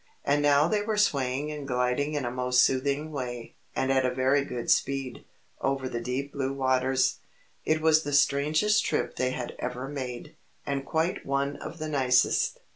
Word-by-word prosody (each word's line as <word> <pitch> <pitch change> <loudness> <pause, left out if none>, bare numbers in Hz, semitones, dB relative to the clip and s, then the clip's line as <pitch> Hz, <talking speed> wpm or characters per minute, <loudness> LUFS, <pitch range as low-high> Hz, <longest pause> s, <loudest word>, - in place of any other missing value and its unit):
And 145 +1 +2
now 145 +1 +4
they 210 +4 +1
were 215 0 -2
swaying 140 -6 +1
and 150 -2 -6
gliding 125 +4 0
in 145 -3 -1
a 120 - -2
most 125 0 +3
soothing 140 +4 0
way, 120 -4 -5 0.2
and 130 - 0
at 135 -1 +3
a 130 - +2
very 130 +2 +2
good 125 -3 -3
speed, 135 -2 0 0.4
over 135 -1 -1
the 120 -2 -4
deep 130 +4 -3
blue 135 -1 -2
waters. 130 -1 +1 0.5
It 155 0 +1
was 155 0 +5
the 145 - -5
strangest 150 +9 +3
trip - - -1
they 130 - +1
had 125 -1 -5
ever 125 +2 -4
made, 130 -4 -6 0.3
and 140 -1 -2
quite 160 +3 -1
one 140 +1 -1
of - - -8
the 155 -1 -4
nicest. 130 -4 +2
135 Hz, 180 wpm, -27 LUFS, 130-145 Hz, 0.5 s, was